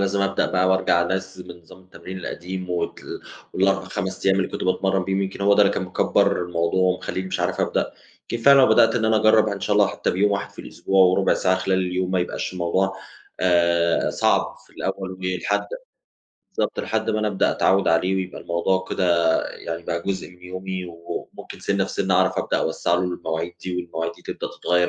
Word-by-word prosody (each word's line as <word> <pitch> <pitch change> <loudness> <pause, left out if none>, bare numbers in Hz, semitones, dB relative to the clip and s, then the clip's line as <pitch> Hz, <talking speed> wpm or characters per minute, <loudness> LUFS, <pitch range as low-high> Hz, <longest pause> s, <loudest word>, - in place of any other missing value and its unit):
لازم 100 0 0
أبدأ 100 0 +1
بقى 95 0 +2
وأرجَع 95 -2 +3
أنظم 95 +1 -4
نظام 85 +1 -16
التمرين 95 0 -10
القديم 90 +1 -6
وتل 90 - -4 0.3
وال4، 95 0 +1
5 95 0 -4
أيام 95 - +4
اللي 95 - -1
كنت - - -4
باتمرن 95 0 +1
بيهم، 95 +1 0
يمكِن 95 +1 -5
هو 100 0 +4
ده 105 - +5
اللي 100 - +3
كان - - -2
مكبّر 90 -1 +1
الموضوع 85 +1 0
ومخليني 95 0 -1
مش 95 - -3
عارف - - -1
أبدأ. - - 0 0.4
يمكن 115 -1 -3
فعلًا 140 0 +8
لو 130 - +6
بدأت 110 0 +5
إن 115 -2 0
أنا 110 0 +3
أجرب 110 0 +4
ه - - -2
إن 100 - -5
شاء 105 - 0
الله 105 -1 +5
حتّى - - -2
بيوم 100 +3 +2
واحد 100 - -2
في - - -25
الأسبوع 95 -1 +2
وربع 95 +1 +3
ساعة 95 0 +2
خلال 95 0 0
اليوم، 90 0 -1
ما 95 - +1
يبقاش 90 - -3
الموضوع، 95 +2 0 0.4
آآ 85 -2 +2
صعب - - +1
في - - -24
الأول 95 -1 -4
ولحد 90 -1 -2 0.9
بالضبط، - - 0
لحد - - -1
ما 110 - 0
أنا 110 - 0
أبدأ 100 -2 +1
أتعوّد 95 0 +2
عليه 90 +3 +2
ويبقى 95 -1 -4
الموضوع 95 +2 0
كده 95 - 0 0.5
يعني 85 0 -6
بقى 85 0 -3
جزء 95 -1 -3
من 90 0 -20
يومي. 95 0 -5
و 85 0 -7 0.2
وممكن - - -10
سِنّة 100 -1 0
في 95 - -7
سِنّة 95 -1 0
أعرَف 95 0 +2
أبدأ - - 0
أوسّع 85 - 0
له 85 - +1
المواعيد 85 -2 -3
دي، 90 -1 -4
والمواعيد 85 -1 -3
دي - - -19
تبدأ - - -5
تتغير 90 0 +2
95 Hz, 205 wpm, -23 LUFS, 90-95 Hz, 0.9 s, فعلًا